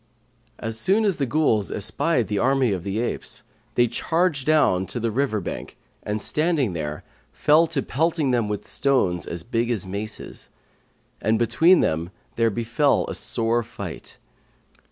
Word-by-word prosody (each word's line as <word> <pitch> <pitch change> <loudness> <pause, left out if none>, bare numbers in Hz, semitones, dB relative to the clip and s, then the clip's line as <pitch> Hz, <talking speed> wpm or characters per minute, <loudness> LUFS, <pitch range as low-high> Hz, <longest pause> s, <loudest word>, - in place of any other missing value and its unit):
As 115 0 -5
soon 200 - +2
as 200 -4 +2
the 140 - -1
Ghuls 115 -8 +1
espied 120 - 0
the 105 -1 -1
army 135 -2 +2
of 95 -3 -2
the 100 +2 -3
apes, 120 +1 -4 0.3
they 120 - +5
charged 160 +4 0
down 95 -12 +3
to 105 - -4
the 115 0 -1
river 125 -2 0
bank 95 - -6 0.2
and 105 +1 -3
standing 150 - 0
there, 75 -2 -4 0.3
fell 155 +3 +4
to 150 -5 -1
pelting 155 0 0
them 120 -3 +1
with 105 -1 -4
stones 110 -11 +1
as 85 -1 -5
big 115 +3 -1
as 110 -5 -1
maces; 105 +3 -6 0.7
and 110 +1 +2
between 140 +11 +4
them 80 +2 0 0.3
there 115 -1 +3
befell 115 +6 +1
a - - -3
sore 115 +1 0
fight. 115 - -8
115 Hz, 155 wpm, -23 LUFS, 105-145 Hz, 0.7 s, they